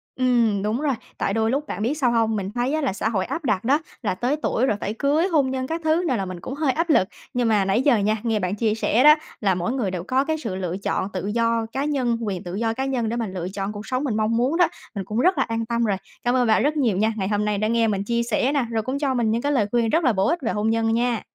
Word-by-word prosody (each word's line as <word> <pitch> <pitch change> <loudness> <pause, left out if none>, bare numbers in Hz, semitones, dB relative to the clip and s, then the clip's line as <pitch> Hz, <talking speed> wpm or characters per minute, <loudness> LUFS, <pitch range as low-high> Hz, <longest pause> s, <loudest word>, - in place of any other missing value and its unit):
Ừm, 235 -6 +2
đúng 220 +6 -1
rồi, 280 -4 +1 0.2
tại 195 - -1
đôi 225 0 +1
lúc 290 +3 -1
bạn 200 - -5
biết 240 +7 +1
sao 255 -5 +2
hông? 225 -1 +1
Mình 195 -1 -3
thấy 245 +4 0
á 310 - 0
là 260 -9 0
xã 220 - -1
hội 190 -4 -1
áp 325 - -4
đặt 210 -6 +1
đó 275 +6 +3 0.2
là 205 -6 -1
tới 250 +8 0
tuổi 255 - +1
rồi 210 -6 0
phải 205 - -2
cưới, 295 +8 +1
hôn 290 -7 +2
nhân 260 0 -2
các 325 +2 -3
thứ 320 +3 +2
nào 255 - +1
là 195 - -2
mình 185 -1 -6
cũng 265 - -6
hơi 285 -2 +1
áp 335 +5 -1
lực. 190 -11 +4 0.3
Nhưng 245 -1 +1
mà 210 -3 +3
nãy 200 +6 +2
giờ 270 -4 +4
nha, 215 +1 +1
nghe 225 -3 0
bạn 185 +1 -1
chia 215 0 0
sẻ 225 +3 +2
đó 300 +1 +9 0.3
là 195 -4 +2
mỗi 180 +6 -2
người 235 -8 -1
đều 180 -2 -4
có 260 +5 +1
cái 315 +1 -1
sự 225 -11 -4
lựa 185 -1 -3
chọn 195 0 -2
tự 190 +1 -3
do 230 +1 +1
cá 275 +2 -2
nhân, 255 -6 0
quyền 195 -5 -3
tự 180 +1 -6
do 225 +1 0
cá 265 +3 -2
nhân 245 -5 -1
để 235 - -2
mà 230 -3 -2
lựa 180 -2 -5
chọn 195 +1 -4
cuộc 210 0 -8
sống 255 +1 -1
mình 240 -7 -1
mong 220 +1 +1
muốn 260 +7 +1
đó, 355 - +5 0.3
mình 195 -2 -4
cũng 215 +3 -2
rất 365 +9 +3
là - - +3
an 230 0 -3
tâm 235 0 -1
rồi. 200 -3 +1 0.3
Cảm 245 +1 +1
ơn 250 -2 +2
bạn 220 +1 +3
rất 300 +2 +1
nhiều 230 -9 +1
nha, 220 +3 +2
ngày 190 -2 -1
hôm 210 0 0
nay 210 -1 0
đã 215 +2 0
nghe 230 0 +2
mình 200 -2 -1
chia 235 +3 0
sẻ 245 +3 +1
nà, 280 -5 0
rồi 220 -1 -1
cũng 260 +3 -3
cho 275 -3 0
mình 235 -3 +1
những 230 - 0
cái 285 - 0
lời 245 -8 +2
khuyên 235 -2 +2
rất 330 +8 +2
là 255 -5 +3
bổ 195 +1 +1
ích 345 - +1
về 230 - -1
hôn 210 +1 0
nhân 225 0 +1
nha. 235 -1 +1
230 Hz, 315 wpm, -23 LUFS, 210-265 Hz, 0.3 s, đó